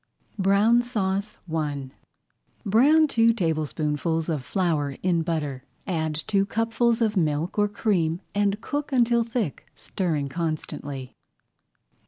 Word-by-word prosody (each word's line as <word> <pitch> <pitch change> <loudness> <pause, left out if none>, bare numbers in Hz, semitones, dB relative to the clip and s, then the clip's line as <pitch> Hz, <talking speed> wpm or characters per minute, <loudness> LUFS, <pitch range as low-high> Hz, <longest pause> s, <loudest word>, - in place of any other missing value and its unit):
BROWN 200 +5 +4
SAUCE 205 -4 -2 0.2
I 145 -4 -2 0.7
Brown 280 +10 +5
two 230 -4 +4
tablespoonfuls 160 -3 -1
of 150 -5 -1
flour 150 -3 -1
in 175 -2 +2
butter. 150 -6 -3 0.2
Add 160 -5 -1
two 195 -1 +2
cupfuls 225 +3 +1
of 215 -1 +1
milk 160 +2 0
or 205 - +4
cream 180 -6 0
and 205 0 +1
cook 290 +3 -3
until 235 -2 +3
thick, 225 - -3
stirring 160 -7 -2
constantly. 145 -4 -4
185 Hz, 115 wpm, -25 LUFS, 155-225 Hz, 0.7 s, Brown